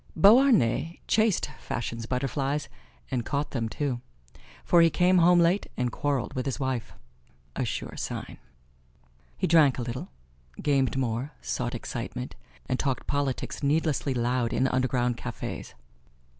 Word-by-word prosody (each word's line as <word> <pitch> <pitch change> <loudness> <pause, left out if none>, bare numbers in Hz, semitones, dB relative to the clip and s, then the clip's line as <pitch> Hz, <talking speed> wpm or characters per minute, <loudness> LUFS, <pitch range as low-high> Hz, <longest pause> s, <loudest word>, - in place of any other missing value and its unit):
Beauharnais 200 - +5
chased 220 -3 +3
fashion's 115 -1 -4
butterflies, 135 +3 -1 0.4
and 120 -2 0
caught 145 +4 -2
them, 115 -4 -2
too, 130 -2 -2 0.6
for 170 - +5
he 165 - +6
came 180 +3 +4
home 175 +1 +6
late 175 +4 +3
and 125 -1 0
quarreled 145 0 -1
with 130 +1 -3
his 135 - -2
wife 130 -4 -2 0.6
a - - -1
sure - - -4
sign. - - -5 1.0
He - - 0
drank 155 -5 +5
a 125 - -2
little, 120 +2 -5 0.5
gamed 135 -3 +1
more, 125 +2 -2
sought 65 0 -3
excitement, - - -5 0.3
and 130 - -1
talked 135 -4 -1
politics 140 -2 -2
needlessly 145 -2 +1
loud 120 0 0
in 130 - +2
underground 125 -2 +1
cafes. - - -6
135 Hz, 135 wpm, -27 LUFS, 125-155 Hz, 1.0 s, he